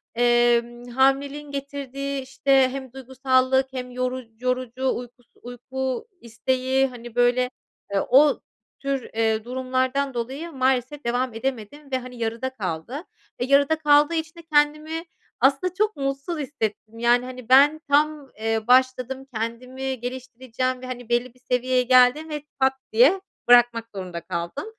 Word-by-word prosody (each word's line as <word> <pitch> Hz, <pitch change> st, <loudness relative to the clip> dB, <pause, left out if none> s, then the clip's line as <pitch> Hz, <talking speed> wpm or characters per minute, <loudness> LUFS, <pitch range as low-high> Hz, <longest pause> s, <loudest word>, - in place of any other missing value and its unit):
emm, 240 Hz, 0 st, +2 dB
hamileliğin 275 Hz, +3 st, +1 dB
getirdiği, 275 Hz, 0 st, -4 dB
işte, 265 Hz, 0 st, +2 dB
hem 265 Hz, -2 st, -7 dB
duygusallık 265 Hz, 0 st, +1 dB
hem 250 Hz, -1 st, -5 dB
yoruc 255 Hz, -1 st, -3 dB
yorucu 255 Hz, +1 st, -1 dB
uykus 245 Hz, 0 st, -10 dB
uyku 260 Hz, -, -5 dB
isteği, 260 Hz, +3 st, 0 dB
hani, 240 Hz, -2 st, -11 dB
böyle, 245 Hz, +1 st, +3 dB, 0.5 s
eee, 195 Hz, -, +2 dB
o 280 Hz, +3 st, +5 dB, 0.4 s
tür, 275 Hz, -1 st, -2 dB
eee, 220 Hz, -1 st, 0 dB
durumlardan 260 Hz, +2 st, -1 dB
dolayı 265 Hz, +8 st, -4 dB
maalesef 260 Hz, 0 st, 0 dB
devam 245 Hz, +1 st, 0 dB
edemedim 265 Hz, +4 st, -5 dB
ve, 260 Hz, -, +1 dB
hani, 250 Hz, 0 st, -10 dB
yarıda 230 Hz, +3 st, -2 dB
kaldı. 215 Hz, -, -5 dB, 0.4 s
Eee, 245 Hz, -, -1 dB
yarıda 280 Hz, +3 st, +4 dB
kaldığı 295 Hz, 0 st, +4 dB
için 320 Hz, +1 st, -3 dB
de -, -, -12 dB
kendimi 305 Hz, +2 st, +2 dB, 0.4 s
aslında 275 Hz, +8 st, +2 dB
çok 425 Hz, +2 st, 0 dB
mutsuz 275 Hz, +4 st, -3 dB
hissettim. 230 Hz, -5 st, -4 dB
Yani, 240 Hz, +1 st, +3 dB
hani, 255 Hz, -1 st, -9 dB
ben 290 Hz, +4 st, +6 dB
tam, 295 Hz, -1 st, +2 dB
eee, 225 Hz, 0 st, -1 dB
başladım, 255 Hz, +1 st, +2 dB
kendimi 250 Hz, +3 st, -4 dB
geliştireceğim 255 Hz, 0 st, -4 dB
ve, 255 Hz, -, -7 dB
hani, 245 Hz, -2 st, -7 dB
belli 240 Hz, 0 st, 0 dB
bir 255 Hz, -, -25 dB
seviyeye 250 Hz, 0 st, +1 dB
geldim 255 Hz, +5 st, +4 dB
ve 300 Hz, -1 st, -5 dB, 0.2 s
pat 265 Hz, 0 st, +4 dB, 0.2 s
diye 275 Hz, -, +5 dB, 0.3 s
bırakmak 240 Hz, -1 st, +5 dB
zorunda 180 Hz, -3 st, -5 dB
kaldım. 170 Hz, -, -4 dB
255 Hz, 140 wpm, -24 LUFS, 240-275 Hz, 0.5 s, ben